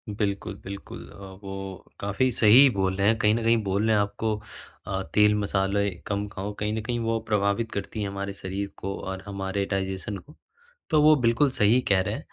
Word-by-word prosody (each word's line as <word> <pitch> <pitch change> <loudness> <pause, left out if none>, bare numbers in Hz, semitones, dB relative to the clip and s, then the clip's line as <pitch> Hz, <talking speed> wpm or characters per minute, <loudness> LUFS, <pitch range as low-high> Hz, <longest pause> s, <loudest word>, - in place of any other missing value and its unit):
बिल्कुल, 100 -2 -2
बिल्कुल। 100 +1 -8
अ, - - -14 0.3
वो 95 -1 -7
काफ़ी 100 +6 0
सही 110 +1 +6
ही 140 - +8
बोल 95 -1 +1
रहे 100 +1 +1
हैं 110 +1 +4
कहीं 105 0 +4
न 115 - -2
कहीं 115 +1 +4
बोल 100 +2 0
रहे 110 - +4
हैं 105 - +4
आपको 105 +1 -1 0.5
अ, 95 -1 -2
तेल-मसाले 100 -1 +2 0.2
कम 100 0 -2
खाओ। 100 +2 -4
कहीं 105 +1 -1
न 110 - -2
कहीं 120 +2 -2
वो 115 0 0
प्रभावित 105 +2 +1
करती 100 +2 -4
है 100 - -1
हमारे 100 0 -4
शरीर 100 +1 -4
को 100 +1 -4
और 95 0 -5
हमारे 100 0 -2
डाइजेशन 95 +1 -2
को। 150 +9 -15 0.5
तो 155 -4 +4
वो 155 +1 +7
बिल्कुल 120 +5 +4
सही 110 +1 +4
कह 95 -2 +4
रहे 95 - -2
हैं। - - -4
100 Hz, 205 wpm, -26 LUFS, 100-110 Hz, 0.5 s, ही